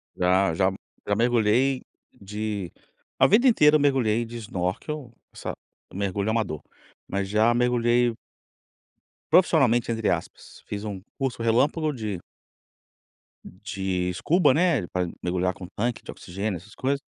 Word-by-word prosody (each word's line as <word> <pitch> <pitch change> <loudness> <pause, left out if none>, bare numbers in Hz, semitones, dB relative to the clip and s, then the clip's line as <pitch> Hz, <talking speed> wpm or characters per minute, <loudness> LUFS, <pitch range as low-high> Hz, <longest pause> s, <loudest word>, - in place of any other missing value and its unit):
Já, 90 0 +2
já 95 +3 +2
m - - -8 0.3
já 100 - +2
mergulhei 120 +3 +2 0.3
de 105 -2 -5 0.5
a - - +7
vida 235 +7 +5
inteira 155 -11 +6
eu - - +5
mergulhei 120 -5 +2
de 120 +1 -8
snorkel, 115 - -4 0.2
sá - - -5 0.4
mergulho 100 +1 -1
amador. 110 -10 -1 0.5
Mas 95 0 -2
já 110 +3 +3
mergulhei 120 0 +2 1.2
profissionalmente, 135 -10 +4
entre 110 -1 0
aspas, - - -5
fiz 105 +1 -5
um 100 -3 -5 0.2
curso 130 -4 -2
relâmpago 140 +7 +2
de 110 -6 -4 1.3
de 95 -2 -3
escuba, 130 - +3
né, 155 - +2
pra 90 0 -1 0.2
mergulhar 90 +1 0
com 90 - -9
tanque 115 +5 -3
de - - -7
oxigênio, 100 +2 -4
essas 95 +5 -15
coisas. 140 +2 0
110 Hz, 135 wpm, -25 LUFS, 95-125 Hz, 1.3 s, a